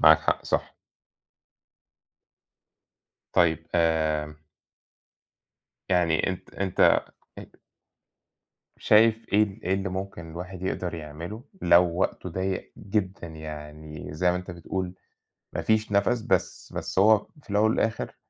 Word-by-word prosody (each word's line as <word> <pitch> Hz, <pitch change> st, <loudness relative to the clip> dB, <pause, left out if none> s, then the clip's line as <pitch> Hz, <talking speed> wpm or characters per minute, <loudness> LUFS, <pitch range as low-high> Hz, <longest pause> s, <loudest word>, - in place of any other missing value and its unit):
معاك 80 Hz, 0 st, +8 dB
حق، -, -, 0 dB
صح. -, -, -1 dB, 2.6 s
طيب 80 Hz, -1 st, +3 dB
آمم 80 Hz, -2 st, +1 dB, 1.5 s
يعني 85 Hz, -3 st, +2 dB
أنت 95 Hz, -, -7 dB
أنت 95 Hz, -2 st, -3 dB, 0.6 s
أ -, -, -9 dB, 1.3 s
شايف 110 Hz, +1 st, +4 dB
إيه 105 Hz, +1 st, +6 dB
ال 105 Hz, +1 st, -3 dB
إيه 95 Hz, +1 st, +2 dB
اللي 95 Hz, 0 st, -2 dB
ممكن 95 Hz, -3 st, -6 dB
الواحد 90 Hz, +2 st, -7 dB
يقدر 90 Hz, -2 st, -2 dB
يعمله 80 Hz, +8 st, -7 dB, 0.2 s
لو 85 Hz, +1 st, +7 dB, 0.2 s
وقته 95 Hz, -, -1 dB
ضيّق 95 Hz, +2 st, -3 dB
جدًا 95 Hz, -3 st, -2 dB
يعني 75 Hz, -1 st, -8 dB
زي 90 Hz, +3 st, +2 dB
ما 90 Hz, -, 0 dB
أنت 90 Hz, 0 st, -6 dB
بتقول 90 Hz, +1 st, -4 dB, 0.6 s
ما -, -, -2 dB
فيش 110 Hz, -1 st, +1 dB
نَفَس، 105 Hz, +4 st, +2 dB
بس 95 Hz, -6 st, -1 dB
بس -, -, -2 dB
هو 105 Hz, +1 st, +5 dB, 0.2 s
في -, -, -23 dB
الأول 105 Hz, +2 st, +3 dB
والآخِر 110 Hz, -1 st, -1 dB
90 Hz, 120 wpm, -26 LUFS, 80-100 Hz, 2.6 s, معاك